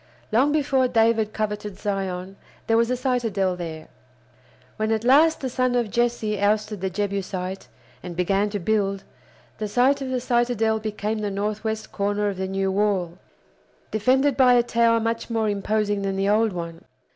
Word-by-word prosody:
Long 260 +7 +3
before 275 -4 +2
David 225 -2 +2
coveted 210 -2 -4
Zion 195 -2 -3 0.3
there 225 - +2
was 230 +1 +3
a 250 - 0
citadel 225 -8 0
there. 160 -3 -7 0.9
When 215 0 0
at 220 0 0
last 295 +6 +5
the 265 - -2
son 255 0 0
of 235 -4 0
Jesse 235 -3 0
ousted 210 -1 0
the 190 - -1
Jebusite, 190 -1 -3 0.3
and 175 -1 -7
began 195 +3 +1
to 205 - -3
build, 195 0 0 0.6
the 215 - -2
site 260 +6 +2
of 265 - -3
the 255 -1 -1
citadel 240 -3 +1
became 215 0 -3
the 210 -1 -2
northwest 215 +2 -3
corner 205 +1 0
of 195 - -5
the 190 0 -2
new 195 0 -1
wall, 190 -3 0 0.7
defended 260 +5 +2
by 250 -2 +5
a 240 - +4
tower 230 -1 +3
much 230 +1 -2
more 225 -2 0
imposing 205 0 0
than 195 -1 -2
the 195 +1 0
old 220 +1 +3
one. 170 -2 -6
215 Hz, 170 wpm, -24 LUFS, 195-235 Hz, 0.9 s, last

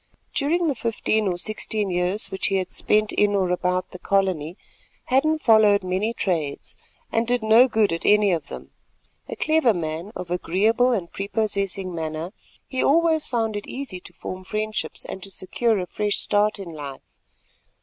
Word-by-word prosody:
During 330 +5 +1
the 300 - +2
fifteen 220 -2 0
or 180 -2 -1
sixteen 215 0 -2
years 180 +4 0
which 190 - -1
he 195 - 0
had 185 -1 -1
spent 215 0 +1
in 205 0 +2
or 185 -2 +1
about 180 0 -1
the 185 - -9
colony, 185 -4 0 0.5
Hadden 295 +5 +2
followed 215 -7 +5
many 185 +5 -1
trades, 165 -10 -2 0.4
and 225 +1 +1
did 245 -1 +1
no 225 +4 +6
good 220 -6 +2
at 165 - -4
any 210 -1 +4
of 170 -2 -1
them. - - -9 0.6
A - - -4
clever 310 -8 +3
man, 165 +3 -4
of 175 -1 -6
agreeable 215 +8 +2
and 190 -8 -2
prepossessing 200 -2 -2
manner, 160 +2 -4 0.3
he 260 - -2
always 320 +1 +3
found 225 -3 -1
it 205 - -5
easy 255 -9 -6
to - - -13
form 185 0 -7
friendships 215 +2 -3
and 190 - -7
to 195 - -8
secure 215 +4 0
a 185 - -2
fresh 205 +3 -1
start 210 +1 +2
in 195 -3 -7
life. 140 -3 -9
205 Hz, 170 wpm, -23 LUFS, 180-225 Hz, 0.6 s, no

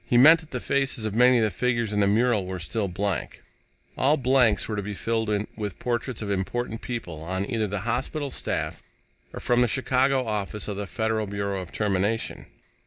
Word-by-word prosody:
He 120 - +3
meant 155 +7 +8
that 160 -2 -13
the 125 - -3
faces 135 -3 0
of 110 - -2
many 125 +2 +5
of 115 - +3
the 110 - +1
figures 115 +1 0
in 105 - +1
the 100 - +4
mural 110 -2 +2
were 95 0 -4
still 100 +4 -2
blank. 95 -3 -3 0.5
All 145 +4 +3
blanks 125 -4 +3
were 110 - -2
to 105 - -1
be 100 +1 -5
filled 110 +1 -1 0.3
with 105 -5 -4
portraits 120 -1 -2
of 100 - -3
important 110 +4 -2
people 90 -11 -5
on 95 +4 -2
either 110 -2 0
the 100 0 -3
hospital 130 +6 -2
staff - - -2 0.5
or - - -7
from 120 0 +2
the 125 - +4
Chicago 130 +2 +2
Office 105 -1 -3
of 105 - -3
the 100 -1 -4
Federal 110 0 -1
Bureau 100 -1 -2
of 90 - -9
Termination. 105 +2 -1
110 Hz, 200 wpm, -26 LUFS, 100-125 Hz, 0.5 s, meant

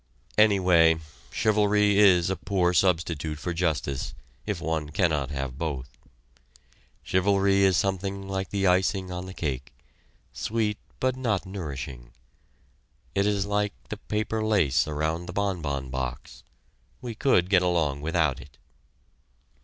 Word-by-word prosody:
Anyway, 90 -6 +5 0.3
chivalry 105 -1 +3
is 95 -3 +5
a - - 0
poor 90 -3 0
substitute 80 -4 +1
for 90 +3 -4
justice, 80 -5 -2 0.3
if - - -2
one 80 -1 -2
cannot 75 -4 0
have 70 -2 -4
both. 70 -5 -4 1.1
Chivalry 100 +1 +2
is 95 -2 +4
something 95 0 -2
like 95 -1 -3
the 100 -1 -1
icing 95 0 +2
on 90 +1 -5
the 95 - -8
cake, 65 -4 -3 0.6
sweet 110 -1 -1 0.2
but 130 -1 +1
not 110 -7 -1
nourishing. 70 -10 -7 1.0
It 100 +1 +2
is 100 -1 +1
like 105 0 0 0.2
the 105 - -4
paper 110 +1 -2
lace 90 - +2
around 80 +3 -2
the 90 - -6
bonbon 80 -10 -2
box 65 0 -5 0.6
we 120 -2 -6
could 105 -6 +2
get 95 -2 +4
along 80 -6 0
without 80 -4 0
it. 70 0 -16
90 Hz, 130 wpm, -26 LUFS, 75-100 Hz, 1.1 s, Anyway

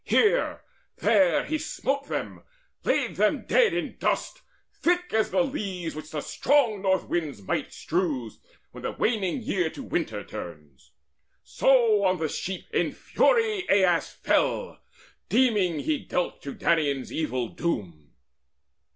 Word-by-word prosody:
Here, 455 +3 +2 0.4
there, 290 +1 +3
he 310 0 -1
smote 280 -2 -2
them, - - -4 0.4
laid - - 0
them - - +2
dead 480 -2 +4
in - - -3
dust - - -1 0.3
Thick 355 +1 0
as 220 0 +2
the 270 - +2
leaves 195 - -4
which 155 0 -8
the 155 -2 -4
strong 245 - +2
North 190 -2 +2
wind's 155 -9 -2
might - - -2
Strews, 150 - -2 0.3
when - - -10
the - - -3
waning 220 +1 0
year 180 -6 0
to 270 - -9
winter 110 - -2
turns; 75 -6 -10 0.5
So 230 -6 +3
on 185 -1 +3
the 160 -2 -2
sheep 190 +5 -4
in - - +1
fury 440 -6 +1
Aias 185 -4 +3
fell, - - 0 0.5
Deeming 205 - +2
he 305 -2 0
dealt 180 - -3
to 140 - -7
Danaans 145 -5 +1
evil 130 -7 -2
doom. 85 - -4
190 Hz, 135 wpm, -26 LUFS, -, 0.5 s, dead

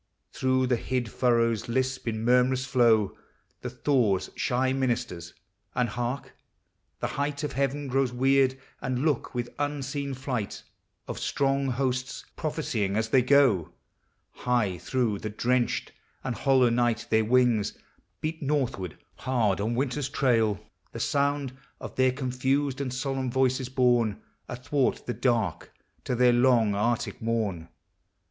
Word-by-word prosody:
Through 130 0 +1
the 125 -1 +1
hid 125 -2 -2
furrows 115 -3 +1
lisp 130 +1 -1
in 110 0 -2
murmurous 125 +1 +3
flow 120 -5 +3 0.5
The - - -4
thaw's 120 -10 +1
shy 130 +1 +1
ministers; 120 -10 -2 0.4
and 125 -1 +1
hark! 120 +4 -4 0.7
The - - 0 0.2
height 145 0 -2
Of 150 - -2
heaven 140 +2 -1
grows 135 -1 +1
weird 135 +1 +3 0.2
and 130 +2 -1
loud 150 -6 +1
with 120 0 -3
unseen 140 -1 -2
flight 125 -5 -4 0.4
Of - - -5
strong 135 0 0
hosts 130 0 -2
prophesying 120 - -2
as 110 0 0
they 130 +2 +5
go! 120 - +3 0.6
High 110 -8 0
through 115 -4 -1
the 110 - -4
drenched 120 +3 0 0.3
and 120 - -2
hollow 130 -3 +3
night 115 -1 +1
their 110 0 +4
wings 120 -2 +2 0.4
Beat 160 +1 -3
northward 135 - -1 0.2
hard 110 -7 0
on 115 +3 -1
winter's 135 +1 -1
trail. 115 -7 +2 0.3
The - - -6
sound 140 -2 0 0.2
Of - - -8
their 130 0 +3
confused 135 +1 -1
and 130 -2 -2
solemn 135 0 -2
voices, 130 0 +1
borne 120 -5 +2 0.3
Athwart 130 +2 -1
the 120 - -2
dark 115 -10 0 0.3
to 125 - -1
their 125 0 +5
long 120 -4 +4
arctic 115 +3 -1
morn. 105 -8 -2
125 Hz, 135 wpm, -27 LUFS, 115-135 Hz, 0.7 s, they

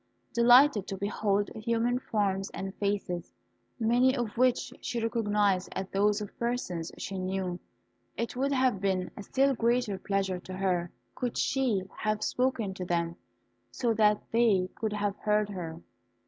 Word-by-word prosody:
Delighted 240 -2 +6
to 195 - -4
behold 200 0 0
human 230 +2 0
forms 200 -5 -1
and 195 0 -4
faces, 200 -4 -2 0.5
many 245 +3 +3
of 235 -4 -2
which 250 0 +2
she 240 - -2
recognised 210 -4 +1
as 190 0 -3
those 205 +2 +2
of 205 - -7
persons 235 -9 -2
she 195 -1 -4
knew, 185 -1 -2 0.6
it 235 +1 -3
would 275 +3 0
have 255 -7 +2
been 190 -2 0
a - - -7
still 270 +7 +2
greater 235 -4 +1
pleasure 195 -2 -1
to 185 +1 -9
her 185 -2 0 0.2
could 245 -2 -3
she 250 -8 +1 0.2
have 215 0 0
spoken 250 -6 0
to 185 - -5
them, 170 -1 -1 0.5
so 235 -3 0
that 210 -1 +4
they 215 -6 +3
could 220 -1 -3
have 205 -1 -1
heard 210 -1 +1
her. 170 -4 -6
210 Hz, 150 wpm, -29 LUFS, 190-235 Hz, 0.6 s, Delighted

